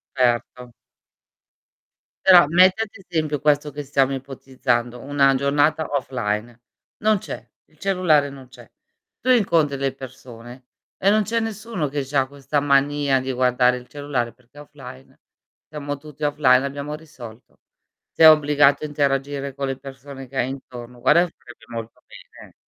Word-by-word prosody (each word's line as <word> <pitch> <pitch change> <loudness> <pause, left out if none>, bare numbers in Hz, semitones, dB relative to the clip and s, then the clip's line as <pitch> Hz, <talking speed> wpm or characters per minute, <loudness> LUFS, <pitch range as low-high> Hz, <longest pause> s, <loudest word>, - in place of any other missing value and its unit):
Erto. 125 -1 -1 1.5
Però, 180 -4 +8
metti 185 +5 +4
ad 225 - -1
esempio 160 -7 -3
questo 150 0 +2
che 145 - -6
stiamo 135 -1 +1
ipotizzando, 125 -3 -3
una 140 -1 +2
giornata 145 +3 +1
offline. 120 -4 -3 0.4
Non 215 0 +3
c'è, - - -8 0.2
il 155 - -30
cellulare 175 -7 +2
non 135 -2 -12
c'è. 125 - -15 0.5
Tu 255 - -3
incontri 170 - +2
delle 135 -1 -2
personem 125 -3 -12 0.5
e 195 - +2
non 215 0 +3
c'è 230 +2 -1
nessuno 215 -8 -4
che 145 -1 -3
c'ha 135 0 +1
questa 140 +1 -3
mania 140 -1 +2
di 130 +1 -4
guardare 125 0 +2
il 125 0 -10
cellulare 145 -5 -3
perché 125 +3 -26
è - - -9
offline, 135 -2 -13 0.5
stiamo 145 -1 -6
tutti 150 +1 -12
offline, 145 -3 +4
e - - -5
abbiamo 145 +2 -6
risolto. 130 -7 -13 0.5
Sei 160 - +7
obbligato 150 -1 +4
a - - -3
interagire 140 -1 -1
con 140 0 -4
le 135 -1 -3
persone 135 0 -11
che 135 - -8
hai 125 - +1
intorno. 125 -2 -10
Guarda 170 +7 +4
che 175 - -12
farebbe 120 -1 -16
molto 115 -1 -8
bene, - - -15
eh. - - -36
140 Hz, 155 wpm, -22 LUFS, 130-150 Hz, 1.5 s, Però